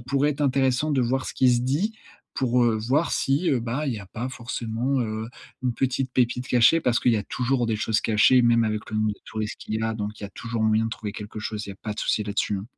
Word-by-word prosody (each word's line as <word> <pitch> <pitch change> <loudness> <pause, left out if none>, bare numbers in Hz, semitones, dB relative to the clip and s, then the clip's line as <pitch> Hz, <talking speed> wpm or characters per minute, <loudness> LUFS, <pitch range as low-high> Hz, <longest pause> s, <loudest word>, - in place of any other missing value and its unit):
pourrait 140 +4 +1
être 150 0 -5
intéressant 135 +1 +2
de 135 - +2
voir 130 +2 0
ce - - -4
qui 130 -1 +4
se 120 - +1
dit, 150 - 0 0.4
pour, 125 -1 +2
heu, 115 -1 +3
voir 130 +9 +1
si, 140 +7 +1
heu, 130 - +2
bah 125 +6 -2
il 135 - 0
y - - -5
a 100 - -11
pas 120 +7 -5
forcément, 120 +1 -2
heu, 110 -1 -3 0.3
une 125 - +1
petite 130 +1 -1
pépite 125 0 0
cachée. 125 +7 +5
Parce 125 -5 +2
qu'il 120 - +3
y - - +3
a 105 - -1
toujours 125 +2 0
des 110 -1 0
choses 110 0 +1
cachées, 115 +4 +4
même 115 -1 +4
avec 110 -1 -3
le 110 - -2
nombre 110 0 +2
de - - -14
touriste 110 -1 -4
qu'il 110 - -5
y - - -3
a, 110 0 -1
donc 105 -1 -5
il - - -5
y - - -3
a - - -14
toujours 115 +1 -4
moyen 110 +1 +3
de 115 - -4
trouver 105 -2 -5
quelque 105 +1 -8
chose. 105 0 -4
Il - - -6
y - - -5
a - - -15
pas 105 - -4
de - - -5
souci 105 - 0
là-dessus, 105 0 -1
hein. 95 - -7
120 Hz, 280 wpm, -25 LUFS, 110-130 Hz, 0.4 s, cachée